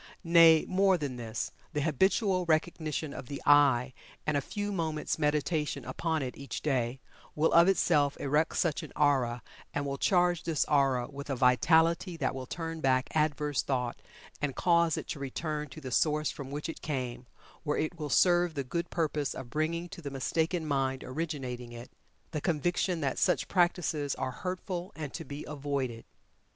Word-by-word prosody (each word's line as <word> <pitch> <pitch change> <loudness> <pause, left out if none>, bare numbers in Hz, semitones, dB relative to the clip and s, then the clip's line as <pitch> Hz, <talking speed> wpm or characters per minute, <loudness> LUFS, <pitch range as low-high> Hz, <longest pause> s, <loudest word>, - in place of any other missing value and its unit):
Nay, 165 -2 +7
more 190 0 +3
than 140 -6 -4
this 115 -2 -4 0.2
the 150 - 0
habitual 185 - +2
recognition 155 -2 0
of 125 - -8
the 140 - -5
"I," 140 -3 +5 0.3
and 150 - 0
a 140 - +2
few 205 +8 -4
moments' 160 -5 -2
meditation 150 -2 0
upon 160 +4 -1
it 125 - -5
each 140 - -6
day, 130 -3 0 0.4
will 155 +2 +2
of 170 +1 +7
itself 150 -7 +3
erect 150 +3 +1
such 165 -4 +1
an - - -9
aura, 130 -5 +2 0.3
and 145 - -1
will 140 0 -3
charge 175 -2 +3
this 165 -3 0
aura 135 -4 +2
with 140 0 -9
a 135 - 0
vitality 160 +7 +3
that 140 -5 -1
will 130 -1 -6
turn 165 +1 -5
back 130 -2 +2
adverse 150 -2 +1
thought, 125 -3 -2 0.4
and 140 -3 -1
cause 170 -2 +3
it - - -5
to - - -4
return 150 +2 -3
to 155 - -10
the 130 -4 -7
source 150 +3 +2
from 140 -2 -8
which 145 +3 -4
it 165 - -7
came, 125 -4 -4 0.3
where 150 -2 -1
it 160 +2 -2
will 150 -1 -3
serve 175 +2 +4
the 140 - -1
good 170 +6 -3
purpose 150 -4 -1
of 125 -2 -8
bringing 165 +3 -1
to 170 - -9
the 145 - -5
mistaken 160 +5 -1
mind 135 -3 0
originating 130 -5 -4
it, 120 +1 -10 0.4
the 150 -3 -3
conviction 175 +2 0
that 135 -2 -1
such - - +2
practices 170 -5 +1
are 130 - -3
hurtful 180 +4 -4
and 150 -3 -6
to 165 - -5
be 145 -1 -7
avoided. 140 -5 -3
150 Hz, 175 wpm, -30 LUFS, 135-165 Hz, 0.4 s, Nay